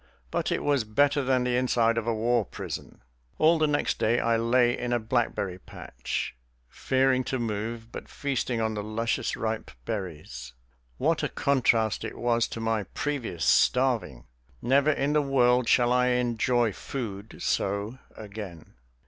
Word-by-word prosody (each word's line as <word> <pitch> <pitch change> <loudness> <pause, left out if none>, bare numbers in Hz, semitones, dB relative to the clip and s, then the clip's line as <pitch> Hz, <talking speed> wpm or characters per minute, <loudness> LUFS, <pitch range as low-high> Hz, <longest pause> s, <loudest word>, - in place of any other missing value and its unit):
But - - -1
it - - -1
was 140 -4 +2
better 140 +7 +2
than 130 -1 +2
the 125 0 0
inside 120 -2 +2
of 115 -1 -2
a 115 - +2
war 115 +1 +2
prison. 90 - -8 0.3
All 160 +1 +4
the 155 - +3
next 145 0 0
day 115 +2 +2
I 115 0 +2
lay 120 +1 +3
in 120 0 -2
a - - +3
blackberry 110 -5 -1
patch, 60 -8 -5 0.3
fearing 130 -1 +1
to 130 - -1
move, 115 0 -4
but - - -8
feasting 130 -4 -2
on 110 0 0
the 105 - -3
luscious, 110 +2 -1
ripe 110 0 -3 0.2
berries. 75 - -6 0.4
What - - +1
a - - -1
contrast 115 -6 +1
it 110 - -6
was 120 -1 +1
to - - -7
my 110 -2 -1
previous 125 - -2
starving! 120 - +2 0.3
Never 140 - +3
in 145 0 0
this 150 - +4
world 125 -3 +3
shall 120 -1 +4
I 125 0 +3
enjoy 120 -2 +1
food 110 -5 -6
so 100 +5 -1 0.2
again. 100 -6 -9
120 Hz, 155 wpm, -27 LUFS, 110-130 Hz, 0.4 s, All